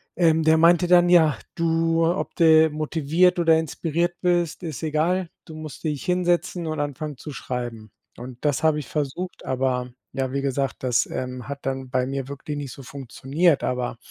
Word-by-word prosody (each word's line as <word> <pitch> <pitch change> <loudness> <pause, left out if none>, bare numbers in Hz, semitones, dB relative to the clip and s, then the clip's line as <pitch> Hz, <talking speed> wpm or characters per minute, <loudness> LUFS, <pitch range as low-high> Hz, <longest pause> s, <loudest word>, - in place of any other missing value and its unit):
Ähm, 160 -2 +3
der 160 0 +5
meinte 170 +2 +5
dann: 175 0 +5
„Ja, 160 -4 +5 0.2
du 165 0 +1
ob 175 +3 -1
du 160 -1 +6
motiviert 160 +4 +1
oder 165 -1 +5
inspiriert 165 +2 -1
bist, 175 -2 +1
ist 160 -2 -5
egal. 165 +4 0 0.2
Du 160 - -10
musst 155 -5 -9
dich 150 -2 -3
hinsetzen 175 -1 0
und 155 -1 -3
anfangen 145 0 -4
zu 150 - -8
schreiben.“ 120 -5 -5 0.3
Und 125 0 -9
das 145 -3 +1
habe 155 -1 +3
ich 145 - -7
versucht, 155 +5 -4
aber, 125 -1 -1 0.2
ja, 130 -1 -2
wie 140 - -1
gesagt, 135 -2 -2
das, 125 -2 +2
ähm, 125 -1 -5
hat 140 0 -7
dann 135 -1 -3
bei 130 0 0
mir 135 0 -4
wirklich 140 +1 -6
nicht 140 -3 -5
so 135 - -11
funktioniert. 140 +5 0
Aber 125 -1 -2
155 Hz, 180 wpm, -24 LUFS, 135-165 Hz, 0.3 s, du